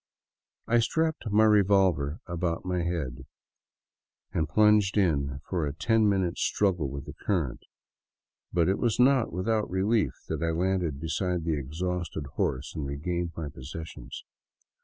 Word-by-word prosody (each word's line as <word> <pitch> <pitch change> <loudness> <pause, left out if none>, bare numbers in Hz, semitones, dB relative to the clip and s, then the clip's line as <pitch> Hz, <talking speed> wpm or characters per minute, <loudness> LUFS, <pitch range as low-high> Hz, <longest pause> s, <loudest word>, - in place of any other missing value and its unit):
I 120 +1 +3
strapped 160 +2 0
my 105 +2 +4
revolver 95 -8 +3
about 85 -1 -2
my 90 -1 0
head 70 -7 -3 1.1
and 80 -1 0
plunged 105 -2 +4
in 70 -8 +1
for 90 -4 -1
a 70 - -3
ten 110 +4 +3
minute 95 -4 0
struggle 90 -8 +1
with 70 +1 -6
the 75 - -8
current, 85 - -2 0.9
but 85 -2 +2
it 95 - +1
was 120 -2 0
not 130 -1 +4
without 105 +5 0
relief 100 +4 +1
that - - -3
I 85 - +1
landed 85 -3 0
beside 90 +2 -1
the 80 - +1
exhausted 80 +2 -3
horse 65 +2 -2
and 75 -3 -4
regained 85 +4 -3
my 80 -2 -3
possessions. 75 +4 -8
90 Hz, 140 wpm, -28 LUFS, 75-100 Hz, 1.1 s, my